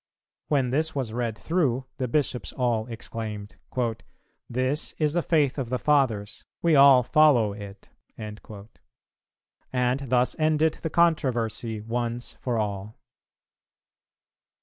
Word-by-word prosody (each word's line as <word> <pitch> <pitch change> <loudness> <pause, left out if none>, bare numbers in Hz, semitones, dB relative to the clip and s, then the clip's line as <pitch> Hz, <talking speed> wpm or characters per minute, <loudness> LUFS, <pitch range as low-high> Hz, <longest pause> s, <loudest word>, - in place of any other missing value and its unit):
When 135 -4 +1
this 155 +3 0
was 125 -6 -2
read 115 -2 -2
through, 135 -7 0
the 130 - -1
Bishops 130 -1 -1
all 120 -3 0
exclaimed, 110 -3 -6 0.9
"This 130 +5 -1
is 150 -2 +1
the 175 - +2
faith 150 -5 +1
of 125 -3 -3
the 125 - 0
Fathers; 120 -9 +1 0.2
we 165 -2 +4
all 135 -2 +8
follow 125 -7 +4
it." 100 -1 -10 0.3
And 105 0 -7 1.7
thus 125 0 +2
ended 155 0 +2
the 160 - -2
controversy 120 -10 +1
once 120 +2 -3
for 120 -2 -1
all. 105 0 -3
125 Hz, 115 wpm, -26 LUFS, 110-150 Hz, 1.7 s, all